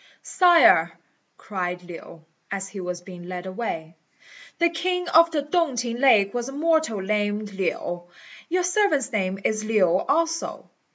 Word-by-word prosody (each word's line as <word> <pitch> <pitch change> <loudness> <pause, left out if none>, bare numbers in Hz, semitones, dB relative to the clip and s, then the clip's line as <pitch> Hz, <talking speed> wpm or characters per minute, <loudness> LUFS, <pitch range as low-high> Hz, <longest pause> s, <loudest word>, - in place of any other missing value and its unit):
"Sire," 350 -2 +5 0.5
cried 180 -3 -4
Lin, 170 -2 -11 0.2
as 195 -1 -4
he 200 - -8
was 180 -1 -5
being 180 -2 -11
led 180 0 -6
away, 180 -5 -5 0.6
"the 340 -1 +2
king 360 +1 -2
of 335 +1 +6
the 305 -3 -2
Tung 320 -2 0
t'ing 235 0 -3
lake 215 -7 +4
was 245 +1 -3
a - - -8
mortal 315 -8 +1
named 205 +1 -2
Lin; 175 -2 -3 0.5
your 360 +2 +1
servant's 355 - +1
name 190 -4 -1
is 215 0 0
Lin 215 -2 +2
also. 310 - 0
215 Hz, 150 wpm, -24 LUFS, -, 0.6 s, of